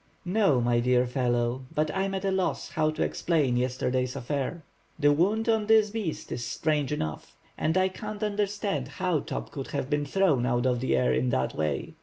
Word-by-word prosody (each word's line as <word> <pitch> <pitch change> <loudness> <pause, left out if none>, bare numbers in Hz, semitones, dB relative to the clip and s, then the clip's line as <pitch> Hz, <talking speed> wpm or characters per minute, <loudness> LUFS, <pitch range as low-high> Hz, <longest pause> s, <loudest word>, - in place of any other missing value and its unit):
"No, 180 - +3
my 120 0 +2
dear 125 +1 +3
fellow, 125 0 -1
and 155 0 +2
I 195 0 0
am 195 0 -2
at 190 +1 -3
a 195 - +2
loss 190 -1 -1
how 155 -1 +1
to 155 - -1
explain 150 -8 +1
yesterday's 125 +1 0
affair." 140 +5 -3 0.3
"The 145 -1 +4
wound 205 +9 +1
on 220 -2 +2
this 220 -1 +5
beast 205 -8 -4
is 120 - -3
strange 150 +3 -1
enough, 80 - -4 0.2
and 160 +3 0
I 185 0 +4
can't 210 +2 -6
understand 205 - -1
how 175 +2 -1
Top - - -5
could 135 -2 -5
have 130 - -3
been 145 0 +1
thrown 165 -7 +2
out 120 0 +1
of 125 -1 +2
the 130 - +1
water 65 -1 +2
in 65 0 +1
that 65 +1 0
way. 75 -3 -2
145 Hz, 200 wpm, -27 LUFS, 125-190 Hz, 0.3 s, this